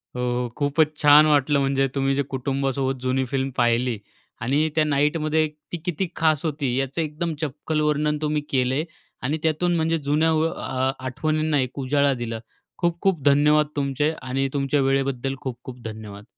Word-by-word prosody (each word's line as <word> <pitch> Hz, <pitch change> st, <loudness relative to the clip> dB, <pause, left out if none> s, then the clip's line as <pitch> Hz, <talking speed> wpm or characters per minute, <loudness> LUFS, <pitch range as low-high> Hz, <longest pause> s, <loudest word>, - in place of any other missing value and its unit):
हो, 125 Hz, 0 st, -1 dB
खूपच 150 Hz, +1 st, +1 dB
छान 145 Hz, +1 st, +8 dB
वाटलं. 145 Hz, -1 st, +3 dB
म्हणजे 135 Hz, 0 st, +1 dB
तुम्ही 135 Hz, 0 st, +1 dB
जे 140 Hz, -, +1 dB
कुटुंबासोबत 135 Hz, 0 st, -1 dB
जुनी 130 Hz, +1 st, 0 dB
फिल्म 135 Hz, +1 st, -1 dB
पाहिली 120 Hz, -1 st, +2 dB, 0.4 s
आणि 145 Hz, +6 st, +1 dB
त्या 155 Hz, -, +4 dB
नाईटमध्ये 150 Hz, +2 st, +1 dB, 0.2 s
ती 175 Hz, -, -2 dB
किती 180 Hz, +1 st, -1 dB
खास 155 Hz, -3 st, +2 dB
होती, 140 Hz, -5 st, -1 dB
याचं 135 Hz, +4 st, -1 dB
एकदम 160 Hz, +2 st, -3 dB
चपखल 155 Hz, +1 st, -2 dB
वर्णन 150 Hz, 0 st, +1 dB
तुम्ही 150 Hz, 0 st, 0 dB
केलय 130 Hz, +3 st, +1 dB, 0.4 s
आणि 145 Hz, +5 st, -1 dB
त्यातून 160 Hz, +2 st, +1 dB
म्हणजे 165 Hz, 0 st, +1 dB
जुन्या 150 Hz, +2 st, +1 dB
व 160 Hz, +1 st, +2 dB
अ, 130 Hz, -4 st, -2 dB
आठवणींना 155 Hz, +3 st, 0 dB
एक 130 Hz, +2 st, -4 dB
उजाळा 140 Hz, +1 st, +2 dB
दिला. 115 Hz, -1 st, -4 dB, 0.4 s
खूप-खूप 175 Hz, -1 st, 0 dB
धन्यवाद 150 Hz, +2 st, +4 dB
तुमचे 145 Hz, +2 st, 0 dB
आणि 135 Hz, +1 st, -1 dB
तुमच्या 140 Hz, 0 st, +1 dB
वेळेबद्दल 135 Hz, -1 st, 0 dB
खूप-खूप 125 Hz, -1 st, -7 dB
धन्यवाद. 105 Hz, -2 st, -8 dB
140 Hz, 155 wpm, -23 LUFS, 130-155 Hz, 0.4 s, छान